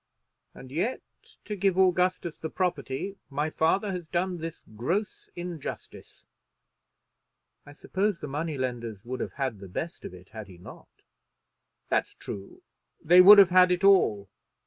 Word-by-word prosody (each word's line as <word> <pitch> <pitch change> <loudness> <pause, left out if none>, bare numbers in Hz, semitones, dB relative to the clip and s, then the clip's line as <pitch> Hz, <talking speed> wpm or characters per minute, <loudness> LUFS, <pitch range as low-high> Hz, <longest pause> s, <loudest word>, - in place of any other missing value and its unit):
And 130 -1 -12
yet, 175 - -2 0.4
to 210 - -4
give 195 -1 +1
Augustus 180 -2 +1
the 160 - -5
property, 175 +1 -3
my 150 +2 -2
father 195 +7 +1
has 180 -3 -6
done 180 +1 -2
this 165 0 -7
gross 175 - -3
injustice." 175 -4 -8 1.4
"I 145 - -12
suppose 195 +4 -2
the - - -6
money 150 +2 -3
lenders 120 -5 -4
would 130 +1 -5
have - - -4
had 130 -7 -3
the 95 -1 -11
best 160 - -6
of - - -7
it 90 +1 -16
had 110 -2 -9
he 90 -3 -14
not." 85 - -15 0.9
"That's - - 0
true. 100 -1 -9 0.4
They 180 +3 +6
would 205 +3 +10
have 195 -3 +7
had 180 0 +6
it 180 +1 0
all. 115 - +4
165 Hz, 150 wpm, -27 LUFS, 130-185 Hz, 1.4 s, would